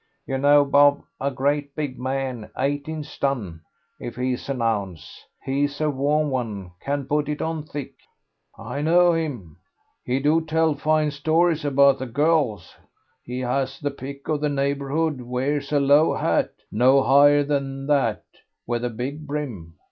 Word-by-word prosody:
You 135 0 -2
know 145 +1 +5
Bob, 145 +1 +4 0.2
a 140 - 0
great 140 +2 -1
big 145 -4 -4
man, 130 -3 -3
eighteen 145 +3 -2
stun 115 - -3 0.4
if 120 - -7
he's 125 +1 -3
an 135 -2 -2
ounce. 100 -7 -3 0.2
He's 140 +2 -1
a 155 -1 +1
warm 145 +1 0
'un, 105 -8 -4
can 140 +3 -3
put 150 +1 0
it 150 - -3
on 160 -1 -2
thick." 145 -2 -7 0.6
"I 140 - -5
know 175 +3 +4
him; 130 - -4 0.5
he 125 +2 -1
do 150 +4 +3
tell 160 0 +1
fine 155 +1 +1
stories 160 +3 +1
about 140 -1 +4
the 130 - -4
girls; 140 - 0 0.5
he 125 +1 -5
has 135 +2 -2
the 145 - -2
pick 140 +1 -9
of 150 -2 -1
the 150 - +1
neighbourhood, 140 +1 -1
wears 135 +4 -2
a 145 - +3
low 145 +3 +4
hat, - - +1 0.2
no 130 +5 +4
higher 145 +2 +5
than 135 -1 -2
that, 135 -7 +1 0.4
with 120 0 -2
a 125 - 0
big 135 +7 -6
brim. 120 - -5
140 Hz, 155 wpm, -23 LUFS, 130-150 Hz, 0.6 s, know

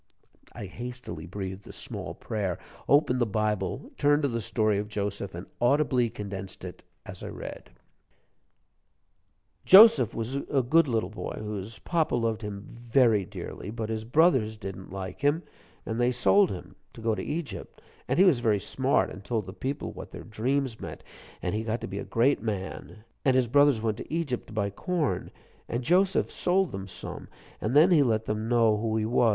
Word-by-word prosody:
I - - -7
hastily 120 -5 -7
breathed 95 +1 -6
a - - -8
small - - -6
prayer, 100 -5 -3 0.3
opened 135 -3 +4
the 120 - +3
Bible, 105 +2 -1
turned 145 +1 +3
to - - +3
the 115 -1 -2
story 110 -1 +1
of 105 - -3
Joseph, 100 -3 -3
and 85 - -6 0.2
audibly 125 -1 +3
condensed 95 -3 -7
it 90 - -9 0.2
as - - -9
I - - -6
read: - - -8 1.9
"Joseph 220 +4 +8
was 115 +4 -2
a 140 -1 0
good 160 +6 +4
little 110 -6 -1
boy 110 - -5
whose 105 0 -5
papa 165 -6 0
loved 115 -2 0
him 105 -1 -6 0.2
very 115 -6 +4
dearly. 95 - -7
But 110 0 -4
his 110 -1 -2
brothers 125 -4 +3
didn't 95 -3 -7
like 95 +2 -6
him. 145 +4 +2 0.4
And 115 +2 -2
they 120 +1 +3
sold 180 +10 +4
him, 90 - -7 0.2
to - - -11
go 110 0 +1
to - - -3
Egypt. 145 - -5 0.3
And - - 0
he 190 - +7
was 165 -10 +5
very 110 -4 +2
smart, 130 +7 +1
and 95 - -9
told 110 -1 -2
the 95 - -8
people 135 +7 -4
what - - -9
their - - -9
dreams 125 +2 -1
meant, - - -7 0.4
and 90 - -1
he 110 +1 -1
got 115 +1 -2
to - - -4
be 95 +2 -5
a - - -4
great 125 +3 +2
man. 105 0 -5 0.2
And 130 -2 +3
his 130 -2 +3
brothers 140 -2 +4
went 110 -2 0
to - - -9
Egypt 155 -7 -2
to - - -11
buy 100 -2 -1
corn, 170 - -1 0.4
and 120 +2 -2
Joseph 185 +7 +3
sold 185 0 +1
them 95 -1 -6
some, - - -7 0.3
and 110 +5 -1
then 160 +5 +7
he 160 -4 +6
let 110 -4 +1
them 110 +1 -2
know 115 -3 +4
who 110 +1 -1
he 110 - 0
was. 120 +1 +3
115 Hz, 190 wpm, -28 LUFS, 105-135 Hz, 1.9 s, Joseph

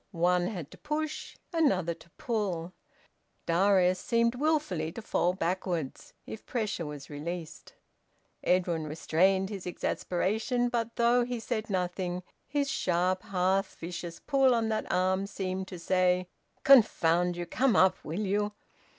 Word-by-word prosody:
One 175 +1 +2
had 175 -9 -6
to - - -14
push, 305 +1 -4 0.2
another 190 - +2
to 170 - -18
pull: 195 - -2 0.7
Darius 185 +1 +3
seemed 235 +2 +2
wilfully 255 - 0
to 230 - -6
fall 180 -3 +1
backwards 175 -4 -3
if 220 - -8
pressure 210 -9 -2
were 150 0 -5
released. 160 +3 -7 0.7
Edwin 175 -3 +1
restrained 190 +5 +1
his 195 -3 -6
exasperation; 220 +8 -1
but 230 -1 -2
though 240 +1 +4
he 245 0 -3
said 220 -1 -3
nothing, 180 -1 -2 0.2
his 285 0 0
sharp 185 -4 +1
half 190 +1 0
vicious 175 0 -6
pull 270 -3 +3
on 225 -1 0
that 215 -1 -2
arm 185 +2 +1
seemed 190 -1 -4
to 185 - -7
say, 180 +1 +2 0.4
"Confound 180 -9 +5
you! 175 - -3
Come 250 +8 +2
up 190 0 +4
will 165 +7 -3
you!" 205 +1 0
185 Hz, 135 wpm, -29 LUFS, 175-225 Hz, 0.7 s, Confound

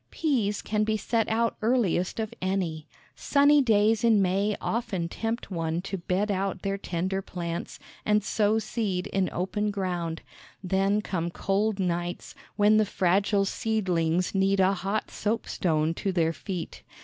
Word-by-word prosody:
Peas 235 -10 0
can 210 0 0
be 215 0 0
set 225 +1 0
out 230 +1 +1
earliest 220 -6 +1
of 220 +1 -3
any. 180 -5 -2 0.3
Sunny 285 0 +4
days 220 -2 +3
in 225 -3 +5
May 195 +2 +1
often 215 -7 -2
tempt 225 +5 -4
one 165 -2 -1
to 195 -1 -4
bed 190 +4 0
out 195 -1 -2
their 195 0 -1
tender 185 +2 -2
plants, 170 -2 -5 0.3
and 210 -1 +2
sow 215 0 +2
seed 205 -5 -2
in 190 -1 0
open 205 +4 -1
ground; 180 -5 -3 0.4
then 195 +3 +1
come 170 -4 -2
cold 200 +4 0
nights, 175 -1 -2 0.2
when 210 +1 +5
the 215 - +4
fragile 195 +2 +2
seedlings 180 -6 0
need 195 0 +2
a 190 +1 +4
hot 195 +3 -2
soapstone 165 -7 0
to 195 +3 -2
their 165 -3 +1
feet. 180 -1 -6
195 Hz, 150 wpm, -27 LUFS, 180-215 Hz, 0.4 s, in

